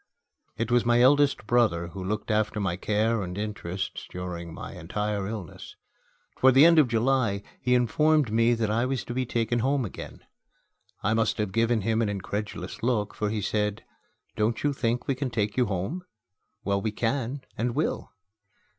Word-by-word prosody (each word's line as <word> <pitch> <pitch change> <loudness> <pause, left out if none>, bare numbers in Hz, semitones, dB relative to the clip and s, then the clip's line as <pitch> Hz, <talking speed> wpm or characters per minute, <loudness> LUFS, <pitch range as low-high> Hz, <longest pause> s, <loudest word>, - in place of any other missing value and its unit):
It 115 +1 -2
was 120 -1 +4
my 120 0 +3
eldest 145 0 +4
brother 105 -8 +2
who 95 +3 -7
looked 105 +4 -2
after 110 0 +1
my 95 -4 0
care 110 +4 0
and 90 0 -5
interests 100 -3 -4
during 85 -2 -6
my - - -8
entire 100 +4 -3
illness. 105 -6 -7 0.6
Toward 130 0 +5
the 140 +4 +8
end 165 -1 +7
of 145 - +5
July, 115 -3 +1 0.2
he 125 0 +3
informed 145 +2 +3
me 115 +2 +3
that 110 -2 -1
I 115 +2 +1
was 130 -1 -2
to 120 - -6
be 130 0 -1
taken 115 0 0
home 135 +1 +1
again. 100 - -8 0.8
I 105 - +2
must 115 0 +1
have 105 -3 -1
given 115 +2 +2
him 110 +3 +1
an 110 - +1
incredulous 100 +2 -5
look, 110 -4 0
for 105 - -2
he 105 0 -2
said, 105 +1 -1 0.5
"Don't 110 +2 0
you 145 -1 +2
think 120 -2 -1
we 135 - +2
can 130 0 -3
take 105 -3 -1
you 125 -2 +2
home? 100 - -3 0.6
Well, 100 0 0
we 110 - -1
can 125 +4 -2
and 120 +1 -1
will." 155 - -1
110 Hz, 180 wpm, -27 LUFS, 105-125 Hz, 0.8 s, the